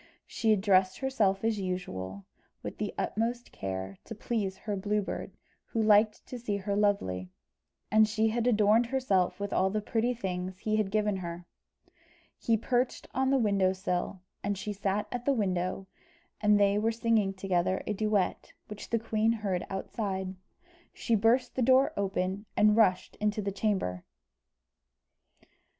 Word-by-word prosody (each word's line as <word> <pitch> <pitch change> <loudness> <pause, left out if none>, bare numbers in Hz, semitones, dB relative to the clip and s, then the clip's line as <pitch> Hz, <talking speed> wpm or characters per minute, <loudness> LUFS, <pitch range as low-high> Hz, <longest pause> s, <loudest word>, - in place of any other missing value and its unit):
She 225 - -1
had 210 -3 +4
dressed 190 -2 +3
herself 215 -8 +1
as 225 -2 +1
usual, 100 - -4 0.4
with - - -6
the - - -2
utmost 235 +2 -2
care, 95 0 -5
to 225 - -7
please 205 -3 -2
her 210 0 -4
Blue 205 +2 0
Bird, - - -6 0.3
who 230 - -4
liked 215 0 +4
to 250 - -7
see 210 -4 -2
her 200 +1 -2
lovely; 95 - 0 0.6
and 215 0 +6
she 220 +1 +1
had 235 +2 0
adorned 220 0 +4
herself 205 -9 +1
with 200 0 -3
all 190 - +3
the 215 +2 -1
pretty 230 +3 0
things 185 -4 -4
he 215 +2 -1
had 215 -3 +1
given 210 -1 +1
her. 175 -1 -6 0.9
He 230 -1 +2
perched 245 +3 -1
on 265 +1 +1
the 275 - +4
window 200 -5 +2
sill, 185 0 -3 0.2
and 200 0 -1
she 210 +2 -4
sat 200 +1 -1
at 245 -1 -4
the 280 - +3
window, 185 -4 -1 0.6
and 210 -1 +4
they 200 0 +3
were 225 +2 +1
singing 225 -3 +1
together 185 -1 0
a 215 - -1
duet, 210 -2 -1 0.2
which 210 -1 -8
the 230 - +2
queen 220 0 +1
heard 200 -6 -1
outside. 190 -1 -3 0.6
She 230 - -1
burst 225 +4 +3
the 260 - -2
door 260 +2 +4
open, 195 +1 -2
and 210 0 +5
rushed 190 -5 +2
into 210 0 0
the 200 -1 -1
chamber. 190 - -1
205 Hz, 160 wpm, -30 LUFS, 190-225 Hz, 0.9 s, and